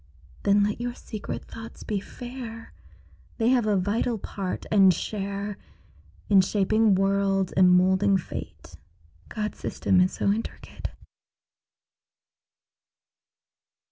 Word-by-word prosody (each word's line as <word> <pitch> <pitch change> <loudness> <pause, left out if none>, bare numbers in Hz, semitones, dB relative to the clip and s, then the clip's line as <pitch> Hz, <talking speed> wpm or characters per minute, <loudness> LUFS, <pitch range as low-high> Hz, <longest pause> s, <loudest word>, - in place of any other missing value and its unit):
Then 200 +1 +4
let 210 +3 -1
your 245 0 -3
secret 215 -2 -6
thoughts 225 0 -10
be 210 -2 -2
fair; 240 +1 -9 0.6
They 225 0 +2
have 245 -4 +3
a 205 -2 +3
vital 220 +5 0
part 195 -2 -5
and 195 -3 +7
share 200 +2 -4 0.7
In 195 -2 +6
shaping 210 +2 +2
worlds 195 0 +1
and 185 -1 +5
molding 190 +2 +4
fate 180 - -8 0.5
God's 210 -1 -4
system 180 - +1
is 185 - +3
so 200 - 0
intricate. 220 +3 -5
200 Hz, 110 wpm, -26 LUFS, 195-225 Hz, 0.7 s, and